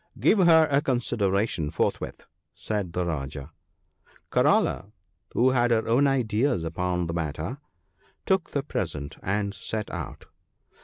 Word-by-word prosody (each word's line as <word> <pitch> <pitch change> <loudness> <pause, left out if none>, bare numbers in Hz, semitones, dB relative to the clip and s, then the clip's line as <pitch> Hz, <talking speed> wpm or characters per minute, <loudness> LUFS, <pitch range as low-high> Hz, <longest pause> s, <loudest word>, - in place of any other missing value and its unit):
" - - -18
Give 215 - +4
her 165 -3 +6
a 140 +1 +4
consideration 105 - 0
forthwith," 80 - -2 0.3
said 105 -5 -3
the 90 -1 -1
Rajah. 70 -2 -4 0.4
' - - -32
Karala, 100 +3 +2 0.4
who 130 +2 +4
had 120 -1 +2
her 115 -2 +1
own 130 +5 +4
ideas 125 - +1
upon 90 +2 -1
the 85 - -3
matter, 80 - -3 0.7
took 190 -3 +1
the 140 - -2
present 75 - -4
and 100 +1 -1
set 105 +3 -4
out. - - -6
105 Hz, 140 wpm, -26 LUFS, 85-130 Hz, 0.7 s, her